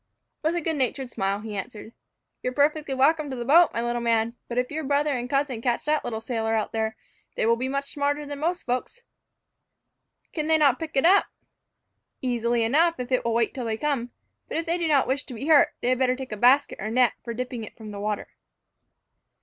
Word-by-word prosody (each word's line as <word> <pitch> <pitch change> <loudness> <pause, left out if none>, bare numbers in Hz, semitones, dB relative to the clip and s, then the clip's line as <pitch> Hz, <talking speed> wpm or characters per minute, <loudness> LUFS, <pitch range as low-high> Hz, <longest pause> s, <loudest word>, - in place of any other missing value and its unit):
With 320 +2 0
a 345 - -1
good 320 -1 -2
natured 260 -1 -1
smile, 195 0 -1
he 215 -1 -6
answered, 210 +3 -7 0.5
"You - - -1
are - - -8
perfectly 295 -1 +1
welcome 295 +3 +3
to 265 - -4
the 240 -1 -4
boat, 330 +6 +6
my 230 - -2
little 240 0 -1
man; 230 0 +1
but 240 - -5
if 250 +2 0
your 315 +1 -3
brother 290 +1 +1
and 245 0 -4
cousin 275 -4 0
catch 240 -1 -1
that 305 0 +1
little 225 -2 -3
sailor 225 -1 -1
out 215 - -1
there, 220 0 -1 0.4
they - - 0
will 230 +1 +4
be 255 +3 -3
much 275 +1 -3
smarter 290 +1 -1
than 285 0 -6
most 345 +4 -1
folks." 255 - -3 1.3
"Can 305 -2 -2
they 320 0 +4
not 280 -5 +3
pick 320 -3 -5
it 270 - +3
up?" 390 +4 +5 0.9
"Easily 240 -2 0
enough, 325 +9 +3
if 250 +1 -5
it 255 - +2
will 230 -1 0
wait 230 -1 +1
till 255 -3 -4
they 220 -1 -2
come. 270 -3 -1 0.4
But - - -4
if 330 - -2
they 340 +1 0
do 335 - 0
not 290 -4 +3
wish 270 +3 0
to 250 - -8
be 255 - -6
hurt, 310 -2 +6
they 245 - 0
had 255 0 +1
better 255 -1 +2
take 260 -2 -8
a - - -2
basket 255 +6 +3
or 215 - -3
net 245 +1 +3
for 235 -1 -5
dipping 250 -1 -4
it 215 - -11
from 220 -2 -9
the 200 - -7
water." 210 0 -3
255 Hz, 230 wpm, -25 LUFS, 230-295 Hz, 1.3 s, boat